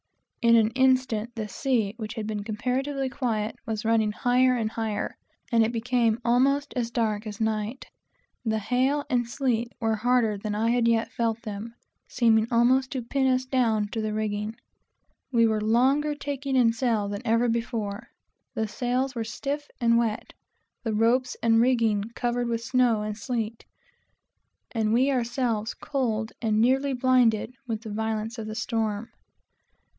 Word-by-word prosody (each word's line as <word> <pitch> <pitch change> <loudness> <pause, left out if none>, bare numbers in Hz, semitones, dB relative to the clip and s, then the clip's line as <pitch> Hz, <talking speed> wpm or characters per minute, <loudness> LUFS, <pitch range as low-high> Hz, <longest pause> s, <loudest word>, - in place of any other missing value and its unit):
In 235 0 +5
an 225 -1 +4
instant 255 -3 +1
the 220 -2 -3
sea, 225 -3 0
which 220 -1 -6
had 220 -3 -4
been 210 -1 -3
comparatively 265 +6 -2
quiet, 225 -5 -2
was 220 -1 -3
running 220 -1 +2
higher 250 +3 +3
and 220 -3 -1
higher; 220 -2 -3 0.4
and 230 -1 +5
it 220 - 0
became 235 -1 +1
almost 275 +4 +2
as 240 -2 -1
dark 220 -2 -1
as 210 -1 -7
night. 220 +2 -2 0.6
The 220 -2 0
hail 255 +7 +1
and 245 -4 0
sleet 240 -3 -1
were 225 -1 0
harder 230 -2 +2
than 210 0 -3
I 225 +2 +1
had 240 -1 +2
yet 230 -1 +1
felt 230 -1 -1
them; 215 +1 -6 0.3
seeming 225 -3 +3
to 235 - -2
almost 260 +3 +3 0.2
pin 270 -1 +2
us 255 0 +2
down 230 -5 +1
to 225 +1 -3
the 215 0 -2
rigging. 215 0 -2 0.8
We 230 -2 +4
were 220 -1 +1
longer 265 +7 +2
taking 280 -1 -3
in 235 -3 +4
sail 230 -4 0
than 200 0 -4
ever 230 +2 +2
before; 230 -2 -2 0.5
for - - -1
the 220 - 0
sails 250 +4 -1
were 230 -2 -2
stiff 280 +6 -4
and 235 -1 +4
wet, 225 -2 -2 0.5
the 225 -2 -2
ropes 245 +4 +2
and 225 0 +4
rigging 230 -5 +2
covered 240 0 -1
with 230 -1 -1
snow 240 -3 +2
and 210 0 -3
sleet, 225 0 -4 1.1
and 220 -2 0
we 255 +5 +3
ourselves 235 -3 -1
cold 230 -6 -2
and 215 -2 +1
nearly 265 +4 +3
blinded 250 -3 +2
with 220 -2 -3
the 220 - -6
violence 220 +1 -2
of 215 - -5
the 215 - -5
storm. 225 -1 -2
230 Hz, 165 wpm, -26 LUFS, 220-250 Hz, 1.1 s, In